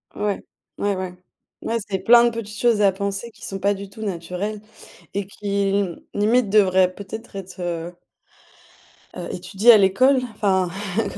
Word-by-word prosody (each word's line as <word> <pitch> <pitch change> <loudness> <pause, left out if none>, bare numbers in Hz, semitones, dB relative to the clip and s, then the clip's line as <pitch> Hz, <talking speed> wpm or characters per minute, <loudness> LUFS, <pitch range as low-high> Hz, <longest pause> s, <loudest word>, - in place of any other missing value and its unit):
Ouais. 205 -1 -2 0.3
Ouais, 200 -1 0
ouais. 185 -1 -4 0.5
Ouais, 230 - -1
c'est 190 -1 -1
plein 235 +4 +6
de 240 - +4
petites 220 -2 -7
choses 235 -4 +3
à 200 - +5
penser, 200 +4 -4
qui - - -18
sont 195 0 -5
pas 200 +1 +2
du 195 0 -8
tout 220 +2 -12
naturelles, 195 +3 -4 0.5
et 200 0 -2
qui 200 0 -2 0.4
limite 215 +2 +2
devraient 190 -3 +4
peut-être 205 +3 -9
être 190 -1 -8
heu 175 0 -4 1.2
heu - - -6
étudiées 215 +4 +4
à - - +8
l'école 235 +8 +4 0.2
enfin, 190 -4 +1 0.3
éco 210 - -2
200 Hz, 160 wpm, -22 LUFS, 190-215 Hz, 1.2 s, à